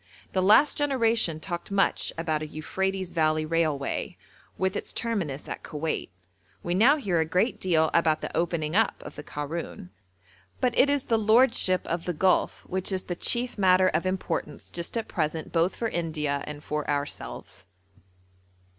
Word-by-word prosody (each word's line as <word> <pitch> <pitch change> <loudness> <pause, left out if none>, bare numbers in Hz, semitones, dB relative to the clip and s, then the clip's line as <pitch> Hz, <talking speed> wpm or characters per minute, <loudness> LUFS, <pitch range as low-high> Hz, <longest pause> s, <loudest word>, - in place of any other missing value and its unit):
The 185 - +2
last 215 +10 +5
generation 230 - +1
talked 175 +1 -5
much 200 -1 +1
about 160 -2 -1
a 155 - -4
Euphrates 190 +4 -3
Valley 155 -2 +1
Railway, 155 -4 -1 0.4
with 190 +1 0
its - - -3
terminus 190 -12 -2
at - - -5
Koweit; 155 - -3 0.5
we 175 - -1
now 240 +11 +5
hear 190 - 0
a - - +4
great 180 +9 0
deal 160 -4 +2
about 160 -2 +3
the - - -5
opening 165 -1 -1
up 225 0 +2
of - - -9
the - - -7
Karoun, 165 +6 -6 0.7
but 250 -2 +1
it 280 - +5
is 285 -2 +1
the 225 -1 +1
lordship 220 -4 +3
of 170 0 -3
the 175 - -1
Gulf 185 +4 +1
which 190 +1 -3
is 185 -1 -1
the 175 - -4
chief 240 +4 -1
matter 185 -1 +5
of 185 - 0
importance 170 -5 -3
just 170 +6 -4
at 225 - -2
present 160 -1 -2
both 170 +2 +1
for 230 - -1
India 155 -6 -2
and 150 0 -7
for 150 0 -3
ourselves. 145 -9 -4
175 Hz, 165 wpm, -27 LUFS, 155-200 Hz, 0.7 s, last